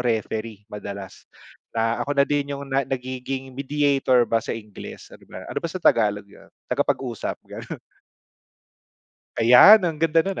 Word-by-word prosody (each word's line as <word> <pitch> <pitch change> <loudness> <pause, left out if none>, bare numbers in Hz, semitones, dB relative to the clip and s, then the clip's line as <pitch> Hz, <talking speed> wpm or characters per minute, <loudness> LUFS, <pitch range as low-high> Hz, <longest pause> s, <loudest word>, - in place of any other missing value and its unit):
referee 110 -2 -3
madalas. 100 -2 -8 0.5
Na 115 +1 0
ako 145 0 -2
na 140 - +5
din 145 -1 -1
yung 140 - -7
na 135 0 0
nagiging 130 +1 -5
mediator 135 -2 +2
ba 115 -1 0
sa 115 - -4
Ingles, 105 -2 -11
ano - - -14
ba - - -9
ano - - -4
ba 170 - -3
sa 170 - -6
Tagalog 105 -1 +3
'yun? 100 - -19 0.2
Tagapag-usap, 130 -3 -2
gano'n. - - -8 1.6
Ayan, 125 - +8
ang 160 -3 -2
ganda 165 0 +3
no'n, 195 -1 -3
130 Hz, 150 wpm, -23 LUFS, 115-145 Hz, 1.6 s, Ayan